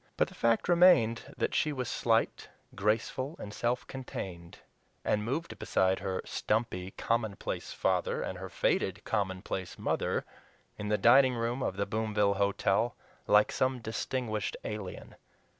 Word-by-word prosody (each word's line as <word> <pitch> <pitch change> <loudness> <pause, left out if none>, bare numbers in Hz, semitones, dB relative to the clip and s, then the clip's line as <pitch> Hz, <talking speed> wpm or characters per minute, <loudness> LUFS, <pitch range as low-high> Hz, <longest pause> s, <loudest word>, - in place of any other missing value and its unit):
But - - +2
the - - -14
fact 115 -1 +2
remained 170 -10 +5
that - - 0
she 155 - +2
was 130 -4 -3
slight, 115 -2 +1 0.2
graceful, 115 - -1
and 105 - -8
self 120 +2 -1
contained, 95 -10 -7 0.5
and 105 - +1
moved 140 +9 -3
beside 95 0 +2
her 95 -1 -3
stumpy, 105 -5 -1
commonplace 110 -3 -2
father, - - 0
and 90 - -5
her 95 0 -6
faded, - - 0
commonplace 95 -2 -2
mother - - -1 0.5
in 105 - -5
the 105 - +3
dining 125 +4 +6
room 120 +3 -1
of 95 - -2
the 100 - 0
Boomville 105 -1 +1
Hotel 100 +3 +1 0.3
like 105 0 +5
some 130 0 +1
distinguished 110 -1 -3
alien. 105 -3 -6
110 Hz, 140 wpm, -31 LUFS, 100-120 Hz, 0.5 s, dining